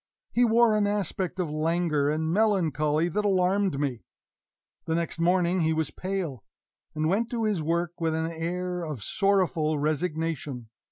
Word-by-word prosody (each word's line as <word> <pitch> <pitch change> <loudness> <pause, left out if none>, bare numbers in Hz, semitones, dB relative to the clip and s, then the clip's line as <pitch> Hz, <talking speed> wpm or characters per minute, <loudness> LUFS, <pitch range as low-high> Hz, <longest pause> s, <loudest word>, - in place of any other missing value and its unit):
He 245 - +3
wore 230 -1 +4
an 210 -1 +2
aspect 195 -2 -2
of 170 -5 -1
languor 155 -2 +1
and 160 +1 -1
melancholy 165 -7 +2
that 210 +5 -1
alarmed 190 -4 +2
me. 130 -6 -2 0.8
The 160 - 0
next 170 0 -2
morning 180 +1 +2
he 160 -1 +2
was 160 -2 -1
pale, 185 - -4 0.5
and 155 0 0
went 215 +7 +1
to 235 -2 -2
his 210 -6 0
work 170 +2 -2
with 160 -1 +1
an 160 +1 -1
air 180 +2 -3
of 150 -10 -5
sorrowful 180 - +1
resignation. 155 -5 -2
170 Hz, 155 wpm, -27 LUFS, 155-190 Hz, 0.8 s, wore